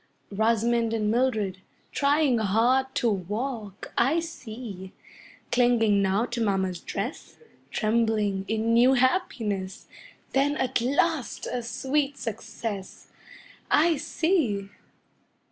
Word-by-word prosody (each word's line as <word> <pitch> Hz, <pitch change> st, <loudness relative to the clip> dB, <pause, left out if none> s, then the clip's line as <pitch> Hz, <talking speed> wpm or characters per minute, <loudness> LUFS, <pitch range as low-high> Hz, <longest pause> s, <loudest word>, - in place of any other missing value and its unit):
Rosamond 230 Hz, +2 st, +1 dB
and 215 Hz, -1 st, 0 dB
Mildred, 220 Hz, -6 st, 0 dB, 0.3 s
trying 280 Hz, -3 st, +2 dB
hard 230 Hz, +6 st, +2 dB
to 240 Hz, -, +1 dB
walk 210 Hz, +1 st, -3 dB
I 280 Hz, +8 st, +3 dB
see! 225 Hz, -, -8 dB, 0.6 s
Clinging 235 Hz, -4 st, +3 dB
now 195 Hz, +4 st, +2 dB
to 245 Hz, -1 st, -4 dB
mamma's 190 Hz, -4 st, 0 dB
dress, 210 Hz, -, -5 dB, 0.3 s
Trembling 215 Hz, -3 st, +1 dB
in 220 Hz, +1 st, 0 dB
new 245 Hz, +3 st, +6 dB
happiness, 225 Hz, -, 0 dB, 0.5 s
Then 285 Hz, +2 st, +2 dB
at 260 Hz, -2 st, 0 dB
last 285 Hz, +3 st, 0 dB
a 250 Hz, -, -3 dB
sweet 270 Hz, +5 st, -1 dB
success 215 Hz, -3 st, -6 dB, 0.6 s
I 320 Hz, +1 st, +4 dB
see! 295 Hz, -, 0 dB
230 Hz, 100 wpm, -26 LUFS, 205-265 Hz, 0.6 s, new